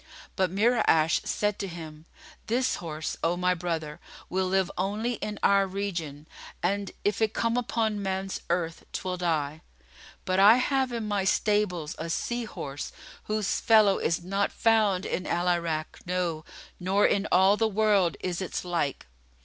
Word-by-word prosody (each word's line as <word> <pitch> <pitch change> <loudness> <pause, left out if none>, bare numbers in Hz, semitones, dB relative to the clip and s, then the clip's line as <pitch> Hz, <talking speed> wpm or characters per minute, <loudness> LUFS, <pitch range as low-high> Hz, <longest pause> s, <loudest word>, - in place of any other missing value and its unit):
But 190 -2 +1
Mura'ash 195 -6 +3
said 210 -1 0
to 195 - -2
him, 160 -3 -9 0.4
"This 250 +3 +1
horse, 155 -2 -5
O 170 +1 +1
my 180 0 +2
brother, 165 -4 -4 0.3
will 185 +1 0
live 190 -1 +1
only 210 +6 -1
in 210 0 -4
our 200 -1 +4
region, 170 -7 -4 0.4
and, 200 +2 0
if 205 +1 0
it 220 0 +1
come 230 0 +1
upon 220 -3 0
man's 190 0 -3
earth, 170 -1 -1
'twill 185 -1 -3
die: 160 -3 -1 0.6
but 185 0 +1
I 205 +4 +8
have 265 0 +1
in 230 -3 -3
my 205 -2 0
stables 190 -5 +1
a 165 - -4
sea 240 +7 -2
horse, 140 -9 -6 0.3
whose 215 -2 -1
fellow 215 -3 +5
is 170 +1 0
not 195 +3 0
found 215 -5 +2
in 185 - -3
Al 175 +1 0
Irak, 170 -3 -1
no, 175 -4 -1 0.3
nor 190 +3 +2
in 200 +1 +2
all 190 +2 +5
the 225 +1 +2
world 205 -4 +2
is 180 0 -2
its 185 - -4
like." 170 -6 -2
190 Hz, 155 wpm, -27 LUFS, 170-210 Hz, 0.6 s, I